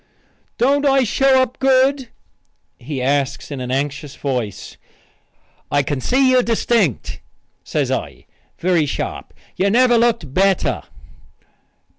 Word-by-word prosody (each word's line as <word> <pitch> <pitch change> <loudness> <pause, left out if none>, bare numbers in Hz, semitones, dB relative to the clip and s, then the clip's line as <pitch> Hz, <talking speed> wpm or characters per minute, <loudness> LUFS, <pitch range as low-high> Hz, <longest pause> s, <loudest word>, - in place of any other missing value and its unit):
"Don't 280 +4 +2
I 270 -2 +3
show 265 +3 +3
up 255 -1 -6
good?" 265 -1 +2 0.7
he 130 0 -5
asks 140 +1 -1
in 135 -2 -5
an 125 - -5
anxious 140 +2 -3
voice. 125 -8 -4 0.9
"I 145 0 +1
can 140 -1 -3
see 260 - +2
you 255 -1 +5
distinct," 230 - 0 0.4
says - - -2
I, - - -4 0.3
very 170 -4 +1
sharp. - - -5 0.3
"You 195 - +2
never 240 +2 +4
looked 230 - 0
better." 195 +2 +1
195 Hz, 120 wpm, -19 LUFS, -, 0.9 s, you